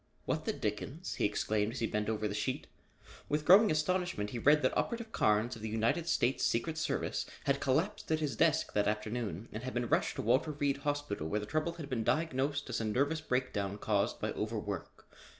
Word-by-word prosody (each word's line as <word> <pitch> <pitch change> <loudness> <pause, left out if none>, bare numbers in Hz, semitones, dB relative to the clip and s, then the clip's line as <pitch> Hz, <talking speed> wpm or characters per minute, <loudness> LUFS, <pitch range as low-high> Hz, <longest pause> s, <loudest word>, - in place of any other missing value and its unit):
"What - - -1
the - - +1
dickens?" 130 - -3
he - - +2
exclaimed 105 +1 0
as 130 - -5
he 115 - +1
bent 105 -1 -1
over 110 -1 0
the 100 - -4
sheet. 130 +7 -2 0.6
With 150 +1 0
growing 205 +6 +8
astonishment 155 - 0
he 120 - -3
read 150 +4 +5
that 130 - +2
Operative 235 -2 -1
Carnes 110 - +2
of 115 - -11
the 110 - -3
United 115 +10 +1
States 130 -5 +1
Secret 155 +7 0
Service - - -1 0.2
had 140 0 +1
collapsed 160 +9 0
at 155 - +2
his 145 -6 -1
desk - - +2
that 105 0 +2
afternoon 105 -2 -2
and 110 - -5
had 130 0 -5
been 120 0 0
rushed - - +1
to - - -3
Walter 130 +7 +2
Reed 140 -1 0
Hospital 145 - -2
where 105 +6 0
the 105 - -5
trouble 155 +7 -1
had 165 -4 -7
been 125 -5 -1
diagnosed 145 0 0
as - - -1
a - - -1
nervous 140 +9 +1
breakdown 120 -8 -1
caused 105 -1 0
by - - -1
overwork. - - -4
130 Hz, 205 wpm, -33 LUFS, 105-155 Hz, 0.6 s, growing